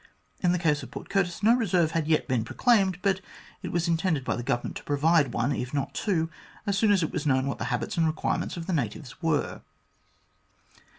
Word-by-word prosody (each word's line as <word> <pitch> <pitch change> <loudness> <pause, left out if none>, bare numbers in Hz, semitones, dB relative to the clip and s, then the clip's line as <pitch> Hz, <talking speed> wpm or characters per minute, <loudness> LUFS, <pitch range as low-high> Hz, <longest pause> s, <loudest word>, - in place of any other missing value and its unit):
In 180 - +3
the 180 - +2
case 150 -3 +1
of - - -9
Port - - -9
Curtis 195 -1 0
no 225 +3 +6
reserve 180 -9 +2
had 160 -2 -1
yet 160 -1 +2
been 125 -5 +1
proclaimed, 195 - +2
but 195 -2 +2 0.4
it - - -5
was 175 0 0
intended 165 -4 +1
by - - 0
the 120 - -3
Government 120 0 -2
to - - -10
provide 145 -1 +3
one, 120 +4 0
if 130 0 -3
not 140 -1 -2
two, 170 -6 0 0.4
as 200 - 0
soon 205 +1 +3
as 195 -4 +3
it 160 - -2
was 150 - -2
known 130 -1 +3
what 140 - -3
the - - -2
habits 125 +3 -2
and 165 -1 +3
require 155 0 0
ments - - -4
of 165 - -5
the 185 - -2
natives 135 +1 -3
were. 160 -3 0
160 Hz, 225 wpm, -27 LUFS, 140-185 Hz, 0.4 s, no